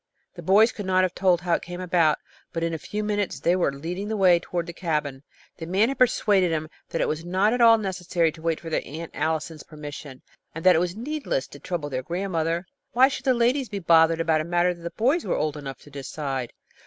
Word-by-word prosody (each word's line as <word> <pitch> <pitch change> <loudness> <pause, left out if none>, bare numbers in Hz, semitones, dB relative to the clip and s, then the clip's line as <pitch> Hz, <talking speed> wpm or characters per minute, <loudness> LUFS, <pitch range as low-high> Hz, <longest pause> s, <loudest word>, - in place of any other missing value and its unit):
The 175 - -9
boys 205 +7 +5
could 205 -3 -7
not 185 0 +3
have 185 -1 0
told 180 -2 +2
how 175 -1 0
it - - +1
came 175 +1 -7
about, 170 -4 +2 0.3
but 165 -1 -3
in 165 0 -1
a 160 - -3
few 210 +7 -4
minutes 205 -1 -1
they 175 - +2
were 180 -6 +1
leading 170 +8 -5
the 220 0 -2
way 180 -3 +5
toward 175 0 -3
the 170 - -7
cabin. 150 -6 -2 0.4
The 165 - -7
man 195 +7 +2
had 275 - -4
persuaded 205 -7 +3
them 155 -1 -2 0.2
that 165 - -2
it - - +1
was 155 +1 -3
not 190 +5 +2
at 245 - 0
all 230 -1 +8
necessary 180 -5 0
to 160 - -14
wait 165 -1 -1
for 165 - -8
their - - +1
Aunt 160 +3 -8
Allison's 160 0 -2
permission, 145 -3 -9 0.3
and 165 - -7
that 185 -1 +7
it - - +4
was 175 +1 -1
needless 275 - -2
to 145 - -12
trouble 160 -4 -4
their 130 -1 -2
grandmother. 170 +1 -2 0.3
Why 260 +3 +6
should 275 - -6
the 260 -2 +4
ladies 245 +2 +1
be 205 - -4
bothered 165 -2 +4
about 160 -1 +2
a - - -3
matter 175 +2 +1
that 170 - -15
the 170 - -4
boys 260 - +1
were - - -1
old 155 -1 -1
enough 140 -3 -7
to 145 - -16
decide? 135 -2 -4
175 Hz, 240 wpm, -25 LUFS, 160-195 Hz, 0.4 s, all